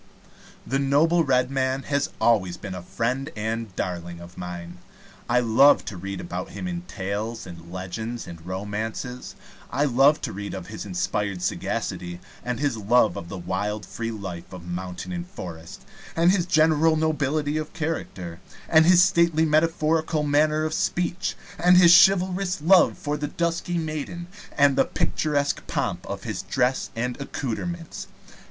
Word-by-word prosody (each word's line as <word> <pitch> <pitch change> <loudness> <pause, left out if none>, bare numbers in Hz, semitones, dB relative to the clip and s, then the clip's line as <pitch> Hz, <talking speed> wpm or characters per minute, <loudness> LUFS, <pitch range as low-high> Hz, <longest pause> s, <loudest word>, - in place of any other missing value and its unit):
The 135 - 0
noble 155 +5 +3
Red 130 -2 +2
Man 135 0 0
has 140 0 0
always 95 -7 +2
been 95 +1 -7
a 90 - -6
friend 125 - -2
and 110 -2 -3
darling 85 -1 -4
of 85 +1 -12
mine. 90 0 -7 0.5
I 125 +1 +4
love 125 +5 +5
to 100 - -5
read 100 +2 -5
about 175 -1 -5
him 180 +1 -5
in 175 -1 -3
tales 105 +3 -4
and 85 -1 -11
legends 100 +6 -5
and 85 -2 -10
romances. 105 +7 -5 0.3
I 140 +4 +1
love 140 +3 +4
to 120 - -4
read 100 +1 -5
of 95 -2 -6
his 110 -1 -6
inspired 95 0 -2
sagacity, 90 -1 -3 0.2
and 125 -1 -3
his 145 -5 0
love 110 -1 +3
of 85 - -7
the 100 - -6
wild 100 +4 -3
free 115 +4 -4
life 95 -6 -7
of 90 -2 -9
mountain 90 - -5
and 175 -1 -4
forest, 85 - -9 0.3
and 170 +2 +5
his 185 -3 +1
general 160 -1 +4
nobility 155 -1 0
of 155 0 -4
character, 95 - -4 0.3
and 160 0 +5
his 180 0 +7
stately 170 -3 +3
metaphorical 155 0 +2
manner 150 +1 +2
of 155 0 -1
speech, 175 +2 -1 0.2
and 180 +1 +6
his 175 -1 +8
chivalrous 185 -1 +1
love 180 +5 +5
for 150 0 -2
the 145 0 -2
dusky 170 +2 -1
maiden, 160 +2 -4 0.3
and 140 -1 +5
the - - +5
picturesque 145 -2 0
pomp - - -2
of - - -5
his - - -3
dress 125 +2 0
and 125 +4 -3
accoutrements. 160 +6 -4
130 Hz, 160 wpm, -25 LUFS, 100-160 Hz, 0.5 s, his